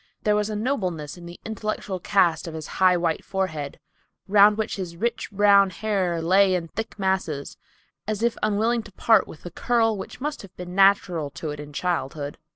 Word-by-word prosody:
There 210 -1 +3
was 210 0 0
a 215 - -3
nobleness 185 - -2
in 175 -1 -11
the 175 - -11
intellectual 215 -3 -4
cast 175 -3 +2
of 160 - -6
his 155 -1 -6 0.2
high, 185 -1 +6
white 170 -2 -1
forehead, 160 -7 -3 0.5
round 205 +1 +6
which 220 -1 -2
his 175 -3 -6
rich 235 +4 -2
brown 200 -1 +5
hair 185 -3 -1
lay 190 +2 +4
in 170 -2 -3
thick 225 +4 -6
masses, 190 -7 -2 0.5
as 215 0 -2
if 235 -1 +2
unwilling 220 +3 +1
to 210 - -14
part 225 +4 +3
with 155 - -12
the 175 - -7
curl 225 +3 +1
which 195 - -8
must 295 +2 -3
have 195 -3 -15
been 180 0 -7
natural 190 -5 +3
to 150 +2 -6
it 145 - -7
in 150 0 -8
childhood. 145 -3 -3
190 Hz, 190 wpm, -24 LUFS, 170-210 Hz, 0.5 s, high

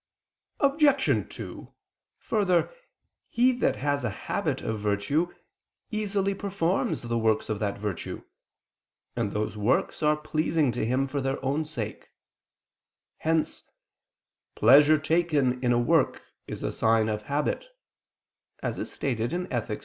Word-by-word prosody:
Obj. 280 -1 +3
2: - - -9 0.4
Further, 195 - +1 0.6
he 250 +2 +4
that 250 - +1
has 145 0 -1
a 120 - 0
habit 95 - -3
of 110 -1 -2
virtue 105 - 0 0.6
easily 200 -2 0
performs 195 - -1
the 115 0 -1
works 110 -1 +1
of 110 -1 -1
that 100 -1 -2
virtue, 100 -4 -5 0.9
and 115 -4 -1
those 105 0 -2
works 105 +4 0
are 150 0 +3
pleasing 155 -2 0
to 120 - -2
him 130 +3 +1
for 140 +1 -3
their 135 +1 -1
own 145 +4 0
sake: 120 -9 -6 1.1
hence 160 0 0 0.9
"pleasure 145 +7 +7
taken 150 -5 +1
in 120 - +3
a 120 - +3
work 120 0 +2 0.2
is - - -6
a - - -1
sign 110 -1 +2
of 105 -1 -2
habit" 150 - -1 1.0
(Ethic. 120 - -2
140 Hz, 120 wpm, -27 LUFS, 115-170 Hz, 1.1 s, pleasure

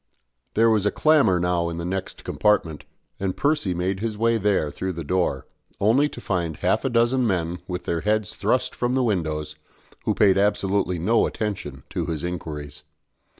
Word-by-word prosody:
There 115 +1 +5
was 105 -2 +2
a - - +2
clamour 140 - +4
now 85 -1 0
in 85 - -5
the 85 - -4
next 95 +1 -4
compartment, 100 -8 +1 0.3
and 95 -1 -2
Percy 145 - +1
made 95 +2 -1
his 110 0 -3
way 115 +1 +2
there 100 -7 +1
through 95 +5 -3
the 85 -1 -5
door, 80 -4 0 0.3
only 125 +9 +3
to - - -9
find 85 -5 -2
half 90 - +1
a 135 - +1
dozen 120 +1 +2
men 90 -3 -1
with 90 -1 -4
their 85 -1 -1
heads 105 0 0
thrust - - 0
from 125 +1 -1
the 130 - +2
windows, 80 -8 -1 0.5
who - - +1
paid 95 -2 +4
absolutely 100 -2 +1
no 105 +8 +2
attention 80 - -4
to - - -2
his 80 -2 -3
inquiries. 75 -4 -5
95 Hz, 180 wpm, -24 LUFS, 85-110 Hz, 0.5 s, There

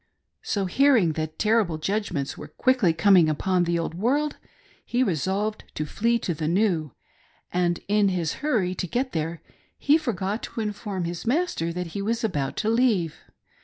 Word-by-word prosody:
So 200 -2 -1
hear 275 +8 +4
ing 175 -7 +3
that 155 0 -4
terrible 215 -7 +2
judgments 170 -5 -2
were - - -9
quickly 250 -9 +2
coming 170 -1 +5
upon 180 +4 +1
the 170 0 +1
Old 165 -1 -2
World, 270 - 0 0.5
he 245 +2 +1
resolved 195 - -1
to 155 - -2
flee 230 +9 +1
to 175 - 0
the 155 0 -3
New, 170 - +1 0.6
and 175 -1 +1
in 205 0 +3
his 175 -4 -1
hurry 220 -12 +1
to 185 - -3
get 255 +8 -1
there 165 +1 -3 0.3
he 295 +3 +4
forgot 210 - -2
to - - -6
inform 205 -3 -3
his 170 +5 -5
master 255 - 0
that 180 0 -3
he 200 - -3
was 230 +3 -1
about 145 -11 -1
to 215 - 0
leave. 225 -9 +2
190 Hz, 170 wpm, -25 LUFS, 170-230 Hz, 0.6 s, coming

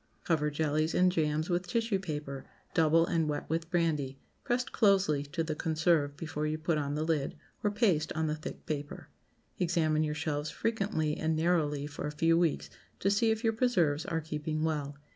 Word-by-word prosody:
Cover 150 -3 +1
jellies 155 +1 0
and 180 0 +5
jams 155 -2 0
with 175 0 -1
tissue 225 0 0
paper, 150 -6 -5 0.3
double 165 +1 +4
and 165 -2 0
wet 145 - -3
with 165 0 -1
brandy, 155 -7 0 0.3
pressed 250 +1 -1
closely 195 - +3
to 165 +4 -3
the 160 -1 -2
conserve 155 -2 +1
before 155 -2 -3
you 155 +1 -1
put 155 0 0
on 145 0 -2
the 155 - -1
lid, 155 -4 0 0.3
or 205 - +3
paste 195 -8 +1
on 160 0 0
the 150 - 0
thick 155 - -8
paper. 145 -2 -5 0.5
Examine 165 -3 +2
your 150 -1 0
shelves 150 -1 -2
frequently 195 -9 -1
and 160 0 0
narrowly 155 -3 +1
for 145 0 -5
a - - -3
few 165 +2 +4
weeks 170 -2 +1 0.3
to 195 - +2
see 225 +3 +3
if 220 +1 0
your 225 -1 +2
preserves 180 - +2
are 165 -3 -2
keeping 155 0 -3
well. 145 -3 -2
160 Hz, 185 wpm, -31 LUFS, 150-175 Hz, 0.5 s, and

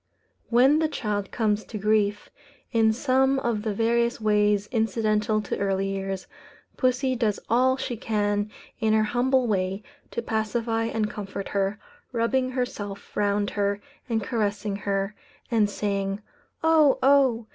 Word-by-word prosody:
When 260 +6 +5
the 320 - +2
child 210 -8 -3
comes 215 -2 0
to 220 - -6
grief, 210 0 +1 0.4
in 225 -2 +4
some 265 +3 +2
of 235 -5 -1
the 215 0 -2
various 235 +3 +1
ways 210 -1 +2
incidental 215 -1 +1
to - - -3
early 195 -1 0
years, 195 -1 -3 0.5
pussy 255 0 +1
does 220 -4 0
all 260 +2 +4
she 245 - -3
can 205 -1 0 0.3
in 220 -2 +2
her 220 0 +4
humble 245 +4 +2
way 195 -2 -1 0.3
to 235 - -4
pacify 225 +1 -1
and 225 -2 -1
comfort 200 -2 -6
her, 200 +1 0 0.3
rubbing 255 +2 +1
herself 205 -6 -5
round 205 0 +1
her 200 0 0 0.3
and 225 -2 0
caressing 205 -2 -1
her, 195 0 -2 0.4
and 215 -3 +3
saying, 200 0 -2 0.4
"Oh! 315 -4 +5
oh!" 265 -4 +4
215 Hz, 140 wpm, -25 LUFS, 205-240 Hz, 0.5 s, When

